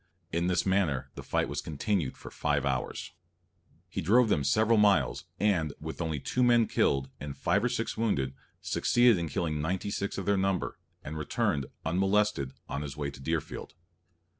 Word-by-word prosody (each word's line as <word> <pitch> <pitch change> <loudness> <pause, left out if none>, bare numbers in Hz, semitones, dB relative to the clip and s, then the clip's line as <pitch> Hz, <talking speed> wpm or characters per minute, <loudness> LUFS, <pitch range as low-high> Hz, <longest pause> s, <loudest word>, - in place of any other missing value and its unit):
In 85 +1 0
this 90 -1 +1
manner 95 -9 +1
the - - -7
fight - - 0
was - - -3
continued 80 0 -1
for - - -10
five 75 -1 0
hours. 65 -2 -2 0.7
He 90 +1 -4
drove 110 +7 +4
them 75 - +2
several 110 +10 +3
miles, 105 -1 +3
and, 85 -8 +2
with 80 +2 -6
only 80 -3 -1
two 125 - -1
men 120 -2 +5
killed, 70 -8 +1
and 70 -1 -6
five 100 +5 +1
or 125 - +2
six 115 -2 -2
wounded, 70 - 0 0.3
succeeded 120 -5 +3
in 85 -2 -2
killing 75 -2 -1
ninety 95 +5 -2
six 100 0 -2
of 95 - -3
their 100 +1 +3
number, 95 -1 -1 0.2
and 75 +1 -5
returned, 70 -2 0 0.2
unmolested, 95 -4 +1
on 70 - -3
his 70 -1 -6
way 70 -1 -2
to 70 - -12
Deerfield. 80 0 -3
85 Hz, 175 wpm, -30 LUFS, 75-105 Hz, 0.7 s, men